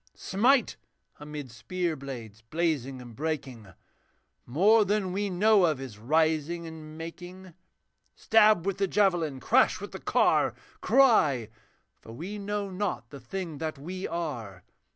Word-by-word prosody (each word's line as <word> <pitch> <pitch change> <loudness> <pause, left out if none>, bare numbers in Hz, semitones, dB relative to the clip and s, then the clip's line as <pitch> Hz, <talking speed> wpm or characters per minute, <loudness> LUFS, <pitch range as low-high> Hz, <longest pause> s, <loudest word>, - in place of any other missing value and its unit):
'Smite! 245 +6 +2 0.4
amid 150 -3 -7
spear 160 +10 -3
blades 120 -6 -8
blazing 135 0 -2
and 120 -2 -12
breaking. 135 -7 -4 0.8
More 205 - +5
than 200 -2 -1
we 200 +1 -1
know 200 +1 +4
of 155 -5 -1
is 125 -6 -8
rising 160 +5 +1
and 155 -1 -10
making. 180 +2 -9 0.6
Stab 215 -5 +4
with 195 -1 -2
the 195 - +2
javelin, 175 -9 +1
crash - - +3
with - - -8
the - - -7
car! - - +2 0.3
Cry! 185 - +4 0.5
for 115 - -11
we 185 - -6
know 205 0 -3
not 185 - -3
the 140 - -9
thing 160 +4 -6
that 155 -2 -3
we 180 +7 -5
are. 120 - -5
165 Hz, 135 wpm, -28 LUFS, 135-195 Hz, 0.8 s, More